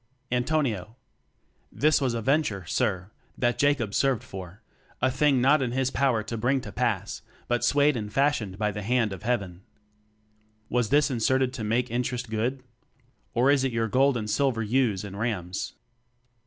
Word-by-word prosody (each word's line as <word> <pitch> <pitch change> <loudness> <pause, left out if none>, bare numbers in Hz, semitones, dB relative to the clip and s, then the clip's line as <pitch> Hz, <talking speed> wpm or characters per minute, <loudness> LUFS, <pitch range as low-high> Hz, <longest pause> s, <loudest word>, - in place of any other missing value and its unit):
Antonio: 125 - 0 0.8
This 150 0 +2
was 125 -3 0
a 115 - -3
venture, 130 - +1
sir, 95 -1 -1 0.3
that 120 -1 0
Jacob 140 -8 +2
served 135 -4 +1
for; 95 -2 -9 0.4
A 130 +1 +2
thing 135 0 +3
not 140 +3 +4
in 120 -2 -1
his 130 0 0
power 130 -6 +1
to 115 +1 -5
bring 130 +4 +2
to 105 - -8
pass, - - -2 0.3
But 120 0 0
sway'd 145 0 +3
and 105 -3 -4
fashion'd 120 -7 0
by 105 0 0
the 105 - -5
hand 115 -1 +1
of 95 - -8
heaven. 100 -7 -2 1.1
Was 120 -3 +1
this 145 +2 +3
inserted 130 +2 +1
to 125 -4 -5
make 115 +3 0
interest 125 -1 -2
good? 125 +4 -1 0.7
Or 125 +4 +4
is 140 -2 +3
your 115 -4 0
gold 130 +3 +3
and 110 -2 -4
silver 125 -1 +1
ewes 110 -3 +1
and 100 -1 -7
rams? 95 -5 -3
120 Hz, 165 wpm, -26 LUFS, 105-135 Hz, 1.1 s, not